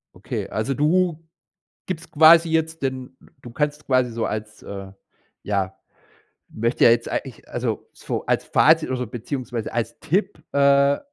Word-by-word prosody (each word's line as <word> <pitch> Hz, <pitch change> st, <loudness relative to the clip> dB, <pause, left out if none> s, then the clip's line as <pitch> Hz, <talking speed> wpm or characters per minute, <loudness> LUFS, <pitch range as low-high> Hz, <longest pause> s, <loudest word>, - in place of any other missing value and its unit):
Okay, -, -, -5 dB
also, 110 Hz, +6 st, -1 dB
du 165 Hz, +3 st, +2 dB, 0.7 s
gibst 165 Hz, -3 st, -5 dB
quasi 165 Hz, +2 st, +7 dB
jetzt 160 Hz, -1 st, -1 dB
den 130 Hz, -1 st, -4 dB
d -, -, -20 dB, 0.2 s
du 120 Hz, -, -9 dB
kannst 150 Hz, +3 st, -2 dB
quasi 130 Hz, -2 st, +2 dB
so 115 Hz, 0 st, -3 dB
als 110 Hz, 0 st, -5 dB
äh, 95 Hz, -1 st, -8 dB, 0.5 s
ja, 95 Hz, -2 st, -2 dB, 0.7 s
möchte 115 Hz, +3 st, 0 dB
ja -, -, +8 dB
jetzt 115 Hz, 0 st, +2 dB
eigentlich 130 Hz, -5 st, -5 dB
also, 120 Hz, -3 st, -3 dB
so -, -, -5 dB
als -, -, 0 dB
Fazit 160 Hz, -1 st, +4 dB
oder 125 Hz, -2 st, -2 dB
beziehungsweise 120 Hz, -1 st, -5 dB
als 120 Hz, -2 st, -3 dB
Tipp: 170 Hz, -3 st, -1 dB
„Äh, 140 Hz, 0 st, +4 dB
130 Hz, 150 wpm, -23 LUFS, 115-155 Hz, 0.7 s, ja